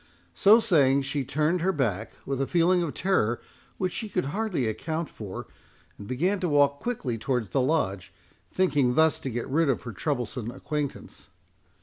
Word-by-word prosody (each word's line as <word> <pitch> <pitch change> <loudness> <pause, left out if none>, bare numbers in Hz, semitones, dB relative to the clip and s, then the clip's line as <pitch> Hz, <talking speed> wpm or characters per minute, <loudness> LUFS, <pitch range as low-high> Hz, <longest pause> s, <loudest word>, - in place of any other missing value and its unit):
So 205 - +6
saying, 140 - +3
she 140 +1 -2
turned 155 +6 0
her 190 +3 +2
back, 110 - -2
with 135 -1 -2
a 135 - 0
feeling 175 +1 +3
of 165 -4 -3
terror 120 - +1 0.4
which 185 -2 -1
she 220 - -4
could 180 -5 -1
hardly 180 - -1
account 155 +8 -3
for, 100 -4 -7 0.5
and 100 - -9
began 180 +11 0
to 180 -3 -1
walk 140 -1 +3
quickly 135 - -3
towards 125 -3 -1
the 135 - +2
Lodge, 115 - 0 0.4
thinking 145 -9 +2
thus 160 -1 +4
to 135 - -4
get 120 -1 -3
rid 155 +2 +2
of 130 - 0
her 120 - -6
troublesome 120 0 -3
acquaintance. 150 +3 -5
140 Hz, 175 wpm, -27 LUFS, 125-170 Hz, 0.5 s, So